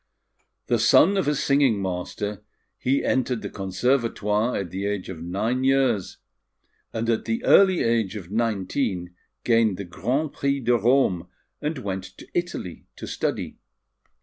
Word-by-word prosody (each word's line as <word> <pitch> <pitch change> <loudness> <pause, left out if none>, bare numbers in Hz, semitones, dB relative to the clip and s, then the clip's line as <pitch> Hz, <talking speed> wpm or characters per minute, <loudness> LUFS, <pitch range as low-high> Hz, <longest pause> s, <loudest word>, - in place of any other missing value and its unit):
The - - +1
son 195 +5 +5
of 190 -7 0
a 150 - +2
singing 140 -6 +2
master, 95 +2 -4 0.4
he 135 +2 +1
entered 125 -3 0
the - - -5
Conservatoire 105 +2 0
at 90 -4 -4
the 95 +2 -3
age 100 -2 -3
of 85 -4 -7
nine 105 +9 -1
years; 130 -7 +1 0.7
and 115 0 -3
at 115 -1 0
the 230 +2 -2
early 190 -3 +5
age 115 -3 +1
of 95 -3 -8
nineteen 100 -4 -1 0.3
gained 115 -5 +3
the 100 - -5
Grand 130 - -2
Prix 140 0 0
de 125 -1 +2
Rome, 115 -6 +2 0.3
and 150 +1 -2
went 95 -5 -5
to - - -12
Italy 175 - -4
to - - -8
study. - - -3
115 Hz, 150 wpm, -24 LUFS, 95-135 Hz, 0.7 s, son